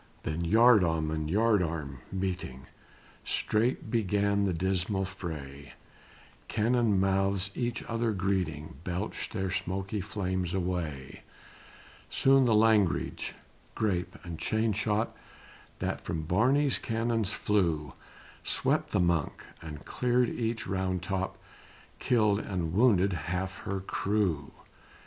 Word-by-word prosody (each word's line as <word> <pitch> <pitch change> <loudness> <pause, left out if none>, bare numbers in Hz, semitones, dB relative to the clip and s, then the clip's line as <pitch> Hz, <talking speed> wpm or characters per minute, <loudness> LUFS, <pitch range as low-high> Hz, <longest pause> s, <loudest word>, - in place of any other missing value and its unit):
Then 80 +3 -2
yardarm 90 -6 +4
and 80 -1 -2
yardarm 85 - +1
meeting, 90 -9 -3 0.6
Strait 110 0 0
began 100 -2 +2
the 95 - +1
dismal 95 +3 0
fray, 75 -7 -7 0.7
Cannon 115 -2 +2
mouths, 95 0 +1
each 120 -1 -2
other 115 -1 -1
greeting, 90 -8 -2
Belched 90 +4 -3
their 95 -3 -2
smoky 95 +3 -2
flames 95 -3 -2
away: 85 -7 -3 0.9
Soon 135 0 +4
the 115 -3 +4
langrage, 105 -4 +2 0.4
grape 95 -5 -1
and 85 -2 -7
chain 110 0 +1
shot, 105 +2 0 0.6
That - - -2
from 80 -2 -3
Barney's 130 - +2
cannons 115 -2 0
flew, 85 -9 0 0.5
Swept - - 0
the - - +3
Monk, 85 -4 +1 0.2
and 75 -2 -8
cleared 125 -1 +1
each 115 -1 -2
round 95 -2 -1
top, 95 0 -2 0.6
Killed 105 -4 +3
and 90 -6 -3
wounded 100 -3 +4
half 90 +4 -3
her 100 0 -2
crew. 95 -6 -1
95 Hz, 110 wpm, -30 LUFS, 85-110 Hz, 0.9 s, yardarm